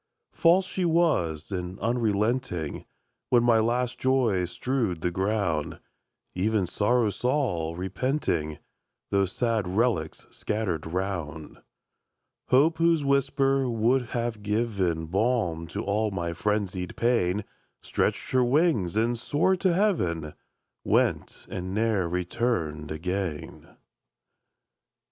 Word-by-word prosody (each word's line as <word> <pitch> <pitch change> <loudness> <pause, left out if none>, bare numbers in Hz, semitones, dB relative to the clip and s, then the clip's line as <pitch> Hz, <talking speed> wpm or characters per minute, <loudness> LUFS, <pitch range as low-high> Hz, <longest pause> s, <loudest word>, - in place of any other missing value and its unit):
False 180 +3 +4
she 185 - -3
was, 155 - +1
and 90 0 -4
unrelenting; 110 - -1 0.4
When 120 -1 +4
my 120 -2 +5
last 120 +2 0
joys 115 -9 +2
strewed 115 -6 -2
the 90 - 0
ground, 95 -4 -1 0.5
Even 100 +1 +1
Sorrow 105 +5 +1
saw, 100 - -1
repenting, 95 - -1 0.5
Those 100 -1 +2
sad 115 -5 0
relics 95 -5 0
scattered 95 -8 -3
round; 85 -4 -4 0.9
Hope, 155 +6 +4
whose 165 -3 +3
whisper 140 -1 +2
would 120 +2 +1
have 120 -3 -3
given 100 -6 0
Balm 95 -3 0
to - - -4
all 105 +2 0
my 85 -4 -3
frenzied 95 -1 -2
pain, 105 -5 +1 0.4
Stretched - - -1
her 130 -1 +4
wings, 125 - +2
and 115 +2 +2
soared 175 +9 +1
to 185 - +3
heaven, 90 - 0 0.5
Went, - - 0
and 95 +1 -5
ne'er 105 -5 +1
returned 90 -4 -2
again! 90 0 -4
105 Hz, 110 wpm, -27 LUFS, 90-125 Hz, 0.9 s, my